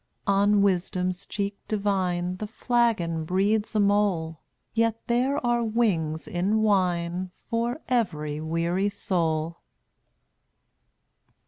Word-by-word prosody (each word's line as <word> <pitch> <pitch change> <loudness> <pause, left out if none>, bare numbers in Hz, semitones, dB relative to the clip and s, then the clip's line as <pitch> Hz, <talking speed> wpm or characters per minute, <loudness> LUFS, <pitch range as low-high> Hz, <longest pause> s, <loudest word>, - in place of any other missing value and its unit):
On 200 0 +4
Wisdom's 185 -1 0
cheek 200 -1 -3
divine 185 -4 0
The 215 - -5
flagon 220 -8 +1
breeds 205 +6 0
a - - +3
mole, 200 -6 +1 0.3
Yet 230 -1 +1
there 255 +4 +1
are 240 0 +2
wings 190 -9 0
in 205 +3 +1
wine 180 -3 +1 0.2
For 235 +5 -1
every 155 -12 -1
weary 170 +5 0
soul. 165 -5 -1
195 Hz, 100 wpm, -26 LUFS, 175-220 Hz, 0.3 s, On